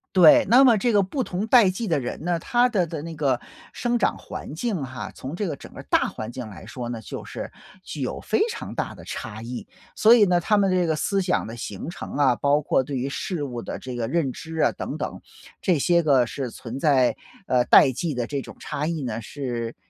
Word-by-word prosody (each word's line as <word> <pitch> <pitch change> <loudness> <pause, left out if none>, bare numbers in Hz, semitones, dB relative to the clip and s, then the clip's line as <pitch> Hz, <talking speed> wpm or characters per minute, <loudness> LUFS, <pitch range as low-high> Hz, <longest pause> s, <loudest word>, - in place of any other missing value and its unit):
对， 170 -4 +8
那 255 +4 +7
么 240 -4 +7
这 235 +4 +1
个 205 -2 +4
不 255 +8 -2
同 190 +2 -3
代 230 -6 +6
际 210 +4 -3
的 160 -5 +1
人 125 +4 -5
呢， 175 -1 0
他 245 +7 +3
的 190 -8 0
的 160 -2 -5
那 165 -1 -6
个 135 -4 +1 0.3
生 240 -1 0
长 - - +1
环 150 - -8
境 195 - -2
哈， 120 -6 -6
从 135 +6 -7
这 205 0 -2
个 150 - -3
整 - - -13
个 - - -10
大 - - +2
环 110 +2 -6
境 120 -3 -7
来 100 - -11
说 120 -2 -6
呢， 115 -2 -4
就 - - -7
是 - - -7 0.3
具 - - -7
有 - - -3
非 - - 0
常 - - -6
大 - - -3
的 - - -12
差 110 0 -6
异。 120 +1 -6 0.3
所 225 +2 +7
以 210 -3 +6
呢， 175 -2 +3
他 210 +5 +2
们 195 -2 +3
这 180 -2 +2
个 160 - +1
思 195 +5 0
想 180 -1 0
的 115 - -7
形 105 - -6
成 - - -8
啊， 130 -4 +4
包 145 +3 +2
括 135 - +2
对 135 0 -4
于 130 +2 -2
事 150 +2 -3
物 120 -4 -4
的 - - -5
这 130 -1 -7
个 115 -2 -2
认 140 -2 0
知 160 0 -8
啊 - - +3
等 - - -5
等， - - -5 0.4
这 180 -5 +2
些 170 +4 +3
个 135 -6 +4
是 130 0 -4
存 120 +3 -7
在， 135 -5 +3 0.3
呃， 125 -1 +3
代 135 - +7
际 145 +3 -3
的 120 -1 -1
这 140 +1 -3
种 - - -11
差 150 +2 -3
异 165 -4 -2
呢， 115 -2 -3
是 120 -2 -4
150 Hz, 260 characters per minute, -24 LUFS, 125-185 Hz, 0.4 s, 对